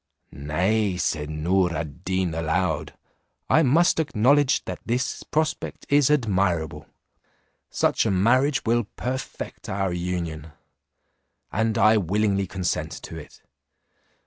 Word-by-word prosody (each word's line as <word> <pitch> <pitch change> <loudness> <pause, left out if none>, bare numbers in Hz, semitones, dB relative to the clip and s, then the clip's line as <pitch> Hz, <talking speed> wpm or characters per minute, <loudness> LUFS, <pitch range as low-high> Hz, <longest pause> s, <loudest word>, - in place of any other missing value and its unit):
"Nay," 90 +7 0
said 75 -4 -1
Noor 90 +3 +1
ad 80 +2 -6
Deen 95 -2 -1
aloud, 80 -1 -1 0.6
"I 160 - +6
must 165 +5 +3
acknowledge 140 0 +2
that - - -5
this 125 +2 -2
prospect 155 0 -2
is 145 -1 +4
admirable; 95 - 0 0.8
such - - +1
a - - +1
marriage 130 +9 +2
will 120 0 +2
perfect 130 +1 -5
our 95 -1 -1
union, 85 -3 -4 1.0
and 110 +2 0
I 110 +1 +5
willingly 100 +1 +1
consent 90 0 -2
to - - -8
it. 75 - -14
95 Hz, 115 wpm, -24 LUFS, 85-120 Hz, 1.0 s, I